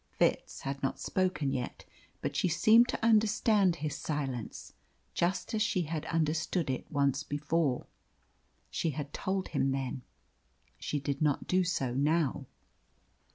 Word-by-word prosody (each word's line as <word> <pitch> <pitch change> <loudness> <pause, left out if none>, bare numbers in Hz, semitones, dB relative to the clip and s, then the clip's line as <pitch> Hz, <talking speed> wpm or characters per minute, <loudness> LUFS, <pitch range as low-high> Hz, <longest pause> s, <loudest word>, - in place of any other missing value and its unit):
Fitz - - +1
had 135 0 -4
not 135 - -1
spoken 185 -7 0
yet, 125 -2 -4 0.4
but - - -2
she - - +2
seemed 220 +8 +6
to 230 - -1
understand 215 -4 +4
his 150 -3 -3
silence, 140 -6 -4 0.4
just 175 +6 0
as 220 - 0
she 210 -5 +1
had 155 -1 -4
understood 160 -1 0
it 130 - -5
once 140 -1 +2
before. 145 -2 0 0.9
She 165 - 0
had 145 -1 -5
told 190 0 -2
him 135 - +1
then. 135 -1 -2 0.8
She 145 - -2
did 140 0 -3
not 150 -3 +1
do 185 0 +2
so 135 -8 -1
now. 150 0 +1
155 Hz, 140 wpm, -31 LUFS, 140-185 Hz, 0.9 s, seemed